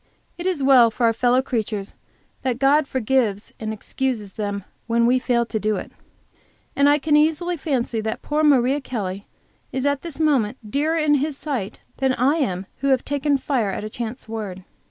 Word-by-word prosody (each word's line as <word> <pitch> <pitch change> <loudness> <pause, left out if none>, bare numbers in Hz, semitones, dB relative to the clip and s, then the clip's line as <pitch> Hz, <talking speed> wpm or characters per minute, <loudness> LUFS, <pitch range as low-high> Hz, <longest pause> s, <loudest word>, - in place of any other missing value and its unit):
It 345 +1 -4
is 345 -7 0
well 260 -4 +7
for 235 +2 -1
our 230 - +4
fellow 250 +2 +2
creatures 215 -6 -3 0.5
that 255 -3 -1
God 275 +2 +3
forgives 235 -5 0
and 220 -1 -3
excuses 220 -2 -3
them, 205 -2 -3 0.2
when 235 0 +2
we 250 +2 +4
fail 240 -2 +1
to 220 -1 -3
do 215 0 0
it, - - -6 0.8
and 280 +1 +4
I 290 - +5
can 300 +1 +1
easily 320 +4 +2
fancy 255 -7 -1
that 220 0 -4
poor 300 +1 0
Maria 275 -1 +4
Kelly 200 -6 -4 0.4
is 260 +1 -2
at 285 -1 +1
this 330 -3 -7
moment 270 -7 +2
dearer 310 +5 +1
in 305 -2 +3
His 295 -1 -2
sight 260 -12 -4 0.2
than 265 -1 +2
I 275 +6 +2
am 190 - -1
who 275 - -2
have 265 -2 +2
taken 285 0 +1
fire 260 -6 0
at 195 - -4
a 215 - -6
chance 235 +2 -6
word. 205 -4 -5
255 Hz, 190 wpm, -22 LUFS, 220-285 Hz, 0.8 s, well